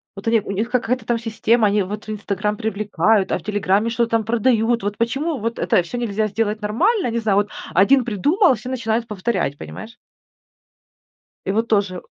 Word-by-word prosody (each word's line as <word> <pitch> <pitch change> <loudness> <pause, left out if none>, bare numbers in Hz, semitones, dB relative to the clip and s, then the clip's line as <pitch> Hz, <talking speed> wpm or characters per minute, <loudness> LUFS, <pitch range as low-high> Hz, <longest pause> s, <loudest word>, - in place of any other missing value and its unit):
Вот 195 +3 -9
они 225 -1 +3
у - - -6
них 215 +4 -2
какая-то 250 -1 -1
там 240 0 +1
система, 225 0 +1
они 205 +1 +2
вот 205 +3 -6
в - - -11
"Инстаграм" 210 0 -2
привлекают, 215 -2 +1
а - - 0
в - - -17
"Телеграме" 205 +1 +1
что-то 230 0 0
там 225 -1 +2
продают. 230 0 +1
Вот 205 0 -3
почему 275 +7 -1
вот 230 +2 -3
это - - +2
всё 175 +8 -6
нельзя 220 -2 -1
сделать 215 +1 -2
нормально. 350 - +1
Не 230 - -2
знаю. 215 -3 +1
Вот 205 0 +1 0.2
1 245 +8 +4
придумал, 285 - +3
и - - -1
все 220 +4 -8
начинают 230 -2 -1
повторять, 205 -8 -2
понимаешь. 225 +9 -9 1.5
И 195 - 0
вот 225 +3 0
тоже. 200 -5 0
220 Hz, 195 wpm, -21 LUFS, 205-235 Hz, 1.5 s, 1